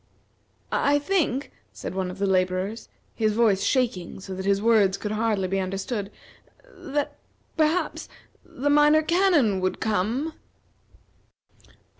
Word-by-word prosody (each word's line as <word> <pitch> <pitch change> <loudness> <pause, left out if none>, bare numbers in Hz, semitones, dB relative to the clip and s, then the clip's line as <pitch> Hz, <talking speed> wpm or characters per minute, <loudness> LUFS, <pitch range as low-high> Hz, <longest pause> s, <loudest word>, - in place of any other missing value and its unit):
"I 285 +1 +2
think," 290 -4 0 0.2
said - - -7
one 190 -1 -2
of 180 - -8
the 200 - 0
laborers, 185 +3 -1 0.2
his 215 -2 0
voice 210 -4 +3
shaking 225 -10 -1
so 190 0 -8
that 190 +1 -5
his 200 0 +3
words 205 -3 +3
could 210 - -4
hardly 215 -3 0
be 195 +1 -1
understood, 195 +2 -3 0.6
"that 290 +1 -3 0.4
perhaps 320 +3 0 0.3
the 285 +3 -2
Minor 295 +1 +5
Canon 325 - +3
would 185 0 -1
come." 220 - -1
215 Hz, 125 wpm, -25 LUFS, 190-290 Hz, 0.6 s, Minor